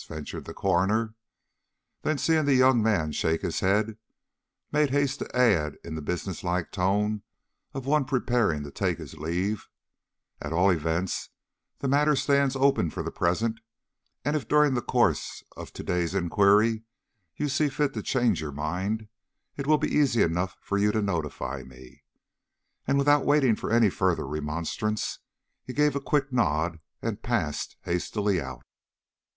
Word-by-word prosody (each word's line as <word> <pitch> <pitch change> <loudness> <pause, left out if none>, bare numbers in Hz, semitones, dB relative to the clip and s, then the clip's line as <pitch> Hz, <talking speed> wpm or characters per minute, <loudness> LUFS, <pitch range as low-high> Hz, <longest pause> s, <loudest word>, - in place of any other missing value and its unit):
ventured 75 -1 -6
the - - -7
coroner. 100 +4 +1 0.9
Then 155 - 0
seeing 160 +1 +2
the 140 -2 +4
young 130 -2 +5
man 100 -8 +1
shake 80 +2 0
his - - -1
head, 105 +3 +1 0.7
made 150 -1 +3
haste 140 0 +1
to - - -6
add 95 - +3
in - - -7
the 80 - -4
business 90 +4 -4
like 90 -1 -1
tone 105 +3 0 0.5
of 135 -2 -4
one 150 0 +2
preparing 120 - +1
to 70 - -8
take - - -1
his - - -9
leave, 90 +6 -2 0.7
"At 75 +1 -4
all 90 +4 +4
events 85 +2 -1 0.5
the 140 - -3
matter 145 +2 +3
stands 140 0 +2
open 135 -10 +3
for - - -5
the - - -4
present; 110 +6 0 0.7
and 145 +2 +1
if 150 - -2
during 150 -2 +4
the 125 - 0
course - - 0
of - - -9
to - - -7
day's 90 0 -1
inquiry 100 +5 +3 0.5
you 150 - -1
see 145 +1 +1
fit 140 0 0
to - - -3
change 120 - +1
your 75 -2 -4
mind, 95 +10 -3 0.5
it 140 -1 -5
will 155 0 +5
be - - -1
easy 135 -6 +4
enough 90 +3 -1
for 100 - -1
you 105 +1 +3
to 110 - +1
notify 85 -7 -3
me." 65 +2 -15 0.9
And 140 +1 +2
without 145 0 +4
waiting 140 -6 +4
for - - -5
any 115 -3 +4
further 90 -4 0
remonstrance, 80 +9 -3 0.4
he 130 - -7
gave 150 0 +2
a 140 - -1
quick 135 -1 0
nod 85 -7 +1 0.2
and 115 -1 -3
passed 100 -12 -2
hastily 95 +2 0
out. - - -8
105 Hz, 160 wpm, -27 LUFS, 85-135 Hz, 0.9 s, young